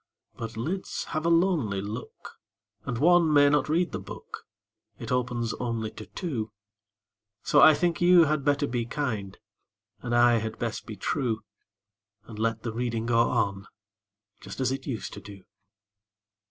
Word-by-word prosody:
But 115 -1 -7
lids 170 +12 -3
have 155 +1 -2
a - - +4
lonely 165 - +2
look, 105 +5 -8 0.5
And 125 -4 -3
one 170 +3 +4
may 145 -1 +6
not 150 0 +2
read 170 +3 +1
the - - -4
book - - -10 0.5
It 115 - -7
opens 120 -2 -1
only 115 -3 -2
to 110 - -10
two; 120 - -4 0.9
So - - +4
I 155 -1 +8
think 175 +2 0
you 175 -1 +7
had 155 -2 0
better 145 0 +2
be 120 -3 -2
kind, 110 -9 -3 0.6
And 120 -1 -2
I 120 0 +5
had 110 0 -5
best 115 -2 -4
be 110 - -6
true, 115 +2 -2 0.8
And 110 -2 -10
let 115 0 -1
the 115 -2 -3
reading 115 -1 -2
go 115 -1 +2
on, 100 -5 -1 0.7
Just - - -9
as 130 -1 +1
it 135 0 -5
used 120 -6 -4
to 100 - -8
do. 100 -1 -12
120 Hz, 160 wpm, -27 LUFS, 110-150 Hz, 0.9 s, I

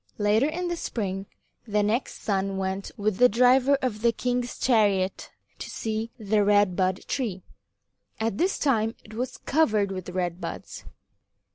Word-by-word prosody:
Later 210 +5 +3
in 350 +3 -3
the 345 - -1
spring, 195 - -3 0.4
the 210 -1 +1
next 225 +5 -1
son 195 -1 0
went 190 +1 -3
with 205 -2 0
the 250 0 +6
driver 255 +4 +5
of 215 -5 -1
the 235 0 +4
king's 245 +1 -2
chariot 200 -6 +2 0.3
to - - -6
see 220 0 -3
the 215 -2 +1
Red 205 -2 +3
Bud 185 0 0
Tree. 215 -9 -2 0.8
At 220 -2 -1
this 375 +3 +1
time 225 -5 +1
it 215 - -13
was 250 +3 -4
covered 215 -10 +1
with 185 -2 -5
red 180 -1 -2
buds. - - -7
215 Hz, 155 wpm, -26 LUFS, 195-245 Hz, 0.8 s, the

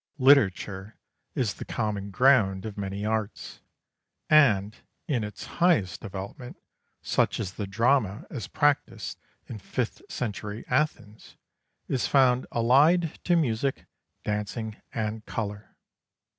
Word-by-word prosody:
Literature 105 -7 +3 0.4
is 115 -5 0
the - - -8
common 105 -3 -3
ground 100 -4 +3
of 110 -2 -5
many 100 0 -4
arts, 110 -1 -3 0.7
and 110 -9 +5 0.3
in 130 -9 0
its 105 -1 -7 0.2
highest 155 - +3
development, 100 +5 -7 0.5
such - - +1
as 95 - -3
the 105 - -4
drama 110 0 +1
as 125 - -5
practised 145 -1 0 0.3
in 110 - -8
fifth 115 +4 -3
century 105 -1 -4
Athens, 125 -6 -2 0.5
is 130 - 0
found 130 -2 +3
allied 145 +8 +3
to 175 - +3
music, 135 -4 0 0.4
dancing, 105 +1 -3 0.2
and 110 -1 -3
colour. 105 -1 -5
110 Hz, 115 wpm, -27 LUFS, 100-130 Hz, 0.7 s, and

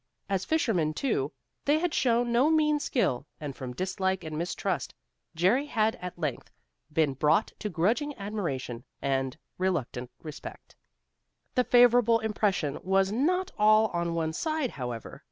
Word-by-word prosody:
As 195 -2 -1
fishermen, 185 - +1
too, 150 - 0 0.3
they 290 +2 +4
had 340 0 -1
showed 240 -1 +2
no 240 +5 +3
mean 305 -2 +3
skill, 150 - 0
and 145 -3 -5
from 130 -2 -6
dislike 190 +1 -1
and 155 -1 -5
mistrust, 170 +3 -2 0.4
Jerry 210 - +3
had 220 -4 +2
at 180 -1 -7
length 150 -7 -3 0.4
been 155 -4 +2
brought 155 - +2
to 210 - -3
grudging 230 - 0
admiration 170 - -4 0.2
and 135 0 -1 0.2
reluctant 135 -9 -1
respect. 155 -3 -9 0.8
The 250 - +3
favorable 245 -2 +5
impression 205 -9 0
was 195 +1 +2
not 360 - +1
all 215 +1 +5
on 170 -1 -2
one 160 -1 -1
side, 310 - -1
however. 120 -4 -6
190 Hz, 140 wpm, -28 LUFS, 155-245 Hz, 0.8 s, favorable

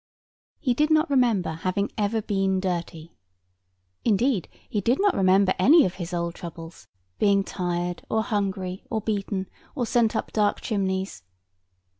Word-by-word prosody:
He 255 -5 +1
did 300 +5 +2
not 310 0 +3
remember 235 -10 +2
having 185 +5 -2
ever 215 +1 0
been 195 -2 0
dirty. 170 -3 -4 0.9
Indeed, 225 - +1 0.2
he 210 - -2
did 240 +7 +1
not 405 -1 +3
remember 190 0 +4
any 295 - +7
of 180 - -2
his 170 +1 -5
old 170 -1 -2
troubles, 165 -1 -10 0.3
being 200 -1 +3
tired, 175 -2 -3
or 220 0 +1
hungry, 195 -3 -2
or 220 - -1
beaten, 200 -2 -2 0.3
or 250 -4 0
sent 230 -1 +2
up - - -2
dark 210 -1 +2
chimneys. 190 - -2
195 Hz, 145 wpm, -25 LUFS, 185-225 Hz, 0.9 s, any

